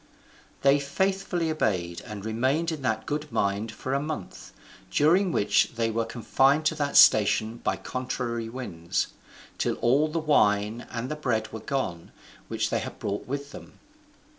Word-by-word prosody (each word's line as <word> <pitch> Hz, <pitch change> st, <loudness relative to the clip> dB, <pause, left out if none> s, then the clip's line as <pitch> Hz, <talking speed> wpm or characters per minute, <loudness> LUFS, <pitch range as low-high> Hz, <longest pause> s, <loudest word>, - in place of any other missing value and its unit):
They 140 Hz, +1 st, +5 dB
faithfully 175 Hz, +2 st, -1 dB
obeyed, 90 Hz, -, -1 dB
and 105 Hz, -2 st, -7 dB
remained 130 Hz, +9 st, 0 dB
in 155 Hz, -3 st, -5 dB
that 110 Hz, -4 st, -1 dB
good 150 Hz, 0 st, -3 dB
mind 100 Hz, +3 st, 0 dB
for 130 Hz, +4 st, -4 dB
a 140 Hz, -, +2 dB
month, 155 Hz, +1 st, -6 dB, 0.4 s
during 175 Hz, -, +3 dB
which 105 Hz, -2 st, +2 dB
they 115 Hz, -1 st, 0 dB
were 115 Hz, +1 st, 0 dB
confined 135 Hz, +6 st, +2 dB
to 160 Hz, -, +3 dB
that 145 Hz, -2 st, +1 dB
station 110 Hz, +1 st, +5 dB
by -, -, -1 dB
contrary 125 Hz, -3 st, -4 dB
winds, 85 Hz, -10 st, -3 dB, 0.5 s
till -, -, 0 dB
all 135 Hz, +6 st, +3 dB
the 155 Hz, +2 st, -3 dB
wine 110 Hz, -7 st, +2 dB
and 120 Hz, +3 st, -4 dB
the -, -, -1 dB
bread 110 Hz, -7 st, -2 dB
were 110 Hz, -, -5 dB
gone 100 Hz, -, -3 dB, 0.4 s
which -, -, -1 dB
they -, -, +1 dB
had -, -, -6 dB
brought 100 Hz, +1 st, -4 dB
with 140 Hz, +2 st, -4 dB
them. -, -, -11 dB
125 Hz, 160 wpm, -27 LUFS, 110-150 Hz, 0.5 s, They